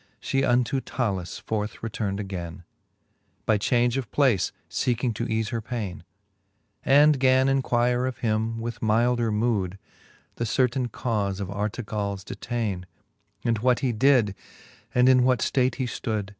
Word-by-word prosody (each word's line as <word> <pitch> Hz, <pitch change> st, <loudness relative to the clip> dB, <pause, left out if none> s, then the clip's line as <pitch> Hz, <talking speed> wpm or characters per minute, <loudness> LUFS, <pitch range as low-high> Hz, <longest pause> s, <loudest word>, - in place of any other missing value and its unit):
She 135 Hz, 0 st, 0 dB
unto 125 Hz, +1 st, +2 dB
Talus 95 Hz, -11 st, -3 dB
forth 105 Hz, +2 st, -4 dB
return'd 105 Hz, -3 st, -3 dB
againe, 90 Hz, -3 st, -6 dB, 0.8 s
By 110 Hz, -2 st, +3 dB
change 120 Hz, +3 st, +2 dB
of 130 Hz, -4 st, -3 dB
place 130 Hz, -, +2 dB, 0.2 s
feeking 125 Hz, -1 st, 0 dB
to 115 Hz, +2 st, -3 dB
eafe 110 Hz, -1 st, -1 dB
her 115 Hz, -, -2 dB
paine; 110 Hz, -5 st, -5 dB, 0.8 s
And 145 Hz, +1 st, +5 dB
gan 130 Hz, 0 st, +4 dB
enquire 125 Hz, -2 st, +1 dB
of 130 Hz, -, -4 dB
him, 110 Hz, 0 st, -1 dB
with 115 Hz, +1 st, -5 dB
mylder 115 Hz, +1 st, +2 dB
mood, 105 Hz, -4 st, 0 dB, 0.6 s
The 120 Hz, -, -1 dB
certaine 125 Hz, +2 st, +1 dB
cau(e 105 Hz, -5 st, -2 dB
of 100 Hz, -2 st, -4 dB
Artegalls 100 Hz, -1 st, -3 dB
detaine; 100 Hz, -5 st, -4 dB, 0.6 s
And 115 Hz, -3 st, +1 dB
what 125 Hz, +2 st, +2 dB
he 130 Hz, -3 st, +1 dB
did, 120 Hz, -3 st, +3 dB, 0.6 s
and 125 Hz, 0 st, +5 dB
in 130 Hz, -1 st, +6 dB
what 125 Hz, 0 st, +3 dB
ftate 130 Hz, +2 st, +1 dB
he 130 Hz, -, -2 dB
ftood. 110 Hz, -4 st, -3 dB
115 Hz, 145 wpm, -25 LUFS, 105-125 Hz, 0.8 s, in